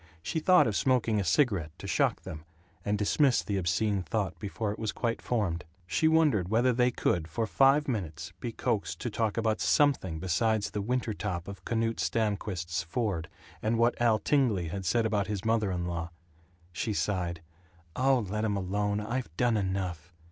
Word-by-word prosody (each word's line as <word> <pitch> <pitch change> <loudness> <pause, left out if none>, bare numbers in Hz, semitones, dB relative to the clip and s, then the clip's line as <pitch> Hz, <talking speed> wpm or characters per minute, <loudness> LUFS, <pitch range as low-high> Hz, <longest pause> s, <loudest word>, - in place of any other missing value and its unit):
She 160 - -1
thought 180 +3 +5
of 110 - -1
smoking 120 -4 +2
a - - 0
cigarette, 90 - +1
to - - -9
shock - - +1
them, 75 0 -7 0.4
and 105 +2 0
dismissed 125 +6 +2
the 100 - -1
obscene 95 +3 +1
thought 95 -1 -2
before 105 +1 -3
it 105 - -7
was 110 -2 -1
quite 115 -1 -2
formed. 95 -9 -1 0.2
She 160 - +1
wondered 150 - +3
whether 120 +4 +3
they 125 +1 +3
could 85 -8 0
for 115 +8 -2
five 135 +6 +4
minutes 90 - -4
be 120 - -4
coaxed 110 -2 -2
to 120 - -3
talk 110 0 -1
about 110 -1 0
something 135 - +2
besides 105 +5 0
the 105 - -2
winter 120 +1 -1
top 90 -5 -4
of 100 0 -8
Knute 115 -1 -1
Stamquist's 95 -6 -1
Ford, 90 -1 -2 0.3
and 115 +1 +1
what 115 +1 +4
Al 115 -2 +4
Tingley 110 - +1
had 95 +2 -5
said 115 +3 +2
about 105 -2 0
his 105 -1 -4
mother 110 -2 +2
in 90 -2 -2
law. 85 -1 -3 0.6
She 105 +5 -2
sighed, 90 -5 -2 0.5
"Oh, 130 -3 +2
let 105 +3 -2
'em 105 -2 0
alone. 100 +2 -1
I've 120 0 -3
done 120 -2 +2
enough." 95 -4 -2
105 Hz, 180 wpm, -29 LUFS, 90-115 Hz, 0.6 s, thought